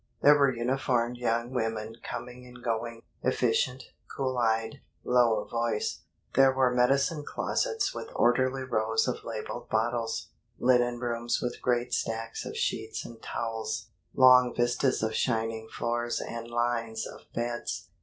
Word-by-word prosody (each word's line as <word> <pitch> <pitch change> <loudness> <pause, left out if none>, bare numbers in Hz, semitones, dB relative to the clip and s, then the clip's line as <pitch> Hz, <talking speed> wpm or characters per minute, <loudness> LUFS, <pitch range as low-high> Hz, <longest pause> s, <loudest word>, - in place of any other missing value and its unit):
There 145 - +9
were 140 -2 +4
uniformed 125 0 0
young 120 0 0
women 115 -2 -2
coming 125 0 -7
and 120 -1 -13
going, 115 0 -2 0.2
efficient, 125 +1 +1 0.3
cool 130 -1 0
eyed, 115 +4 0 0.2
low 120 -3 +3
of - - -18
voice. 115 -2 -1 0.3
There 135 0 +6
were 130 -1 +2
medicine 140 +5 +2
closets 450 - -1
with 450 - -6
orderly 130 +2 +2
rows 110 -2 +1
of 125 - -2
labeled 115 +1 -6
bottles, 115 +1 -1 0.3
linen 120 -1 +3
rooms 120 -1 -1
with 125 - -4
great 125 0 0
stacks 115 0 -2
of - - -6
sheets - - -2
and 115 -1 -11
towels, 115 -1 -4 0.2
long 125 -1 +7
vistas 120 +1 +1
of 110 0 0
shining 115 -1 -1
floors 120 0 -1
and 115 0 -5
lines 120 -2 -1
of - - -11
beds. 120 -7 -3
120 Hz, 140 wpm, -29 LUFS, 115-125 Hz, 0.3 s, There